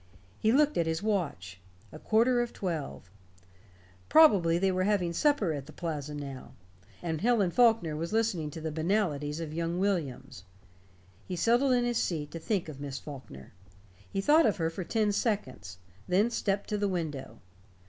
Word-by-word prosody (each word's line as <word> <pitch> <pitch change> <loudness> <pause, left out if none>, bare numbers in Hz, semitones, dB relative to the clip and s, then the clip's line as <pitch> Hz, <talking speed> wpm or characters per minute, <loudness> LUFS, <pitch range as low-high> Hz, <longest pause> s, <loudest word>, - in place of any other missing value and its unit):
He 220 - +2
looked 295 0 +3
at 165 - +1
his 160 +3 -2
watch. 140 - -2 0.3
A - - -10
quarter 240 +3 +3
of 240 - -4
twelve. 145 - -5 1.0
Probably 200 - +6
they 190 +2 +2
were 185 0 0
having 190 -5 +1
supper 225 - +2
at 140 -2 -6
the - - -10
Plaza 150 -4 -5
now, 140 -3 -8 0.5
and 160 -3 -2
Helen 215 -5 +2
Faulkner 225 -9 +3
was 165 +4 -4
listening 215 -9 0
to 160 +1 -8
the 160 0 -3
banalities 155 -3 -1
of 160 -2 -5
young 170 +1 -2
Williams. 140 - -2 0.8
He 185 - -3
settled 240 +8 +3
in 245 -1 +2
his 240 -1 0
seat 150 -4 -2
to 165 - -6
think 190 +1 -1
of 140 -3 -9
Miss 140 -2 -5
Faulkner. 130 - -10 0.6
He 195 - -1
thought 300 +5 +5
of 210 - 0
her 165 -2 -1
for 185 +2 -5
ten 215 +3 0
seconds; 130 - -2 0.3
then 205 +6 +2
stepped 200 -3 -1
to 210 -1 -1
the 205 -1 0
window. 150 - -4
175 Hz, 170 wpm, -29 LUFS, 150-215 Hz, 1.0 s, Probably